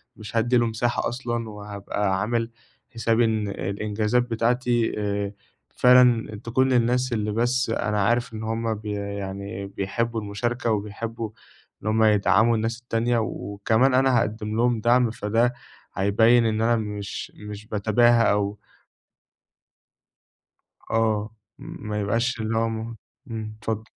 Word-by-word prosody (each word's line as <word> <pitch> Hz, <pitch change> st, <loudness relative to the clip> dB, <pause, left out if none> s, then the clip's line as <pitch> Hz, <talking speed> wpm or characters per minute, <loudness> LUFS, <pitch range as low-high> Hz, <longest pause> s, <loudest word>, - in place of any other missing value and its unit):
مش 110 Hz, +2 st, -10 dB
هادّي 120 Hz, +2 st, +3 dB
له 120 Hz, -, +3 dB
مساحة 115 Hz, +2 st, -1 dB
أصلًا 120 Hz, -2 st, -3 dB
وهابقى 100 Hz, -1 st, -3 dB
عامل 115 Hz, +1 st, -1 dB, 0.4 s
حسابي 115 Hz, 0 st, +2 dB
إن 110 Hz, -2 st, 0 dB
الإنجازات 105 Hz, +5 st, -1 dB
بتاعتي 120 Hz, 0 st, +1 dB
آآ، 100 Hz, -1 st, -2 dB, 0.4 s
فعلًا 125 Hz, -4 st, +4 dB
تكون 130 Hz, +3 st, +1 dB
للناس 125 Hz, 0 st, +2 dB
اللي 105 Hz, -2 st, -1 dB
بس 120 Hz, +3 st, +1 dB
أنا 105 Hz, -2 st, 0 dB
عارف 120 Hz, +1 st, +1 dB
إن 110 Hz, -, -6 dB
هُم 115 Hz, 0 st, -1 dB
بي 105 Hz, 0 st, -6 dB
يعني 100 Hz, -1 st, -5 dB
بيحبوا 110 Hz, +4 st, -2 dB
المشاركة، 115 Hz, +3 st, -2 dB
وبيحبوا 110 Hz, +2 st, -3 dB, 0.5 s
إن -, -, -4 dB
هُم 110 Hz, +1 st, +3 dB
يدعموا 105 Hz, +2 st, +4 dB
الناس 115 Hz, +2 st, -2 dB
التانية، 120 Hz, 0 st, 0 dB
وكمان 110 Hz, +4 st, 0 dB
أنا 130 Hz, -1 st, +4 dB
هاقدِّم 110 Hz, 0 st, -2 dB
لهم 120 Hz, 0 st, +2 dB
دعم 120 Hz, 0 st, +3 dB
فده 115 Hz, +2 st, +1 dB, 0.4 s
هيبيّن 115 Hz, +5 st, +4 dB
إن 110 Hz, 0 st, 0 dB
أنا 115 Hz, +1 st, +3 dB
مش 105 Hz, -3 st, -5 dB
مش 105 Hz, 0 st, -9 dB
باتباهى 115 Hz, +3 st, +3 dB
أو 105 Hz, 0 st, -1 dB, 2.3 s
آه، 110 Hz, -1 st, +1 dB, 0.3 s
ما 105 Hz, 0 st, -5 dB
يبقاش 115 Hz, +4 st, 0 dB
اللي 110 Hz, +1 st, -1 dB
هو 115 Hz, 0 st, +1 dB
م 115 Hz, +1 st, -5 dB, 0.3 s
إمم، 110 Hz, -1 st, -5 dB
اتفضل. 110 Hz, 0 st, -3 dB
110 Hz, 130 wpm, -24 LUFS, 105-120 Hz, 2.3 s, فعلًا